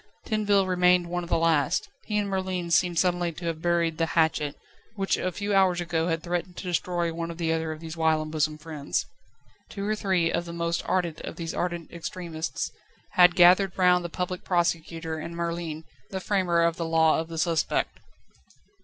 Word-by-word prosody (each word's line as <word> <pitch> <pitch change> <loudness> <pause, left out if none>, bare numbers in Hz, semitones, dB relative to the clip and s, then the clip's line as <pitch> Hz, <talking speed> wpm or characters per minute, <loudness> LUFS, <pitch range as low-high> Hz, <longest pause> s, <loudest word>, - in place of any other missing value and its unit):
Tinville 205 -2 +2
remained 180 -1 +3
one 175 0 -1
of 170 - -9
the - - +3
last; 165 0 +2 0.2
he 210 - -1
and 205 -1 0
Merlin 185 -3 -2
seemed 175 0 +3
suddenly 175 -1 +2
to 170 +2 -8
have 165 -1 -3
buried 170 -2 +1
the 165 - +2
hatchet, 160 -3 +2 0.4
which 195 -2 +1
a 185 - -2
few 205 +3 -3
hours 190 -3 +4
ago 165 -1 -1
had 165 -2 -1
threatened 175 +1 -3
to - - -6
destroy 175 -1 -1
one 165 0 -4
or 170 - -6
the 165 -1 0
other 160 0 -1
of 155 0 -7
these 160 0 -7
whilom 160 -1 +1
bosom 155 -1 0
friends. 155 -2 -3 0.6
Two 200 -1 -5
or 215 +1 +1
three 185 -5 +1
of 170 +1 -1
the 170 - -7
most 170 0 -1
ardent 175 -4 0
of - - -6
these 165 -1 -5
ardent 175 -2 -3
extremists 170 -1 -4 0.4
had 180 -1 +6
gathered 180 +1 +6
round 180 -1 +4
the 170 - -4
Public 180 +1 -4
Prosecutor, 165 -2 -1
and 170 +2 -6
Merlin, 170 -2 -3 0.3
the 190 - -3
framer 185 -3 +1
of 170 0 +1
the 170 - -2
Law 160 -1 +3
of 160 - -3
the 165 0 -7
Suspect. 160 -1 0
170 Hz, 195 wpm, -26 LUFS, 165-180 Hz, 0.6 s, had